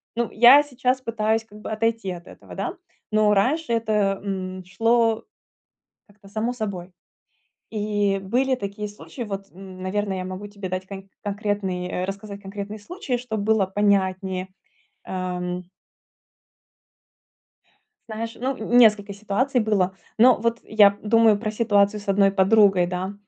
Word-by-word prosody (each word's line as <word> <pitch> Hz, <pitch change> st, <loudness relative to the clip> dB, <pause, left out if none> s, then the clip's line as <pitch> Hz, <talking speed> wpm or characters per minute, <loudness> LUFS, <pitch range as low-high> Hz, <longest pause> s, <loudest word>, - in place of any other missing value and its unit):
ну, 235 Hz, -1 st, -1 dB
я 245 Hz, +6 st, +8 dB
сейчас 255 Hz, -2 st, -1 dB
пытаюсь 225 Hz, -2 st, 0 dB
как 210 Hz, -1 st, -15 dB
бы 215 Hz, -, -7 dB
отойти 225 Hz, -3 st, -1 dB
от 175 Hz, 0 st, -9 dB
этого, -, -, -13 dB
да, -, -, -3 dB, 0.4 s
но 215 Hz, -1 st, +4 dB
раньше 250 Hz, +6 st, +1 dB
это, 210 Hz, -3 st, +1 dB
м, 185 Hz, -1 st, -4 dB
шло 225 Hz, +4 st, +2 dB, 0.8 s
как-то 205 Hz, -1 st, -20 dB
само 220 Hz, +4 st, -2 dB
собой, 200 Hz, -6 st, -5 dB, 0.8 s
и 205 Hz, -2 st, 0 dB
были 255 Hz, +7 st, +1 dB
такие 210 Hz, -2 st, -5 dB
случаи. 210 Hz, +4 st, -9 dB
Вот, 195 Hz, -3 st, -6 dB
н 185 Hz, 0 st, -11 dB
наверное, 195 Hz, 0 st, -2 dB
я 185 Hz, -, -4 dB
могу 185 Hz, +2 st, -6 dB
тебе 200 Hz, -2 st, -7 dB
дать 185 Hz, +1 st, -4 dB
кон 195 Hz, 0 st, -9 dB
конкретный, 200 Hz, -3 st, -2 dB
э, 180 Hz, 0 st, -3 dB
рассказать 200 Hz, +1 st, -6 dB
конкретный 200 Hz, +2 st, -6 dB
случай, 255 Hz, -, -4 dB
чтоб 220 Hz, -3 st, -4 dB
было 210 Hz, -1 st, +2 dB
понятнее. 190 Hz, -1 st, 0 dB, 0.6 s
Ам. 180 Hz, -1 st, -4 dB, 2.5 s
Знаешь, 225 Hz, +1 st, -5 dB
ну, 260 Hz, +2 st, -1 dB
несколько 220 Hz, -3 st, +4 dB
ситуаций 215 Hz, +7 st, 0 dB
было. 200 Hz, -4 st, +1 dB, 0.2 s
Но 250 Hz, +2 st, +6 dB
вот 230 Hz, +1 st, -1 dB
я 205 Hz, -2 st, +5 dB
думаю 225 Hz, -1 st, +4 dB
про 215 Hz, +1 st, -3 dB
ситуацию 210 Hz, -2 st, +2 dB
с 205 Hz, -, -14 dB
одной 195 Hz, 0 st, +4 dB
подругой, 195 Hz, -2 st, +4 dB
да. 185 Hz, +2 st, -3 dB
205 Hz, 140 wpm, -23 LUFS, 195-225 Hz, 2.5 s, я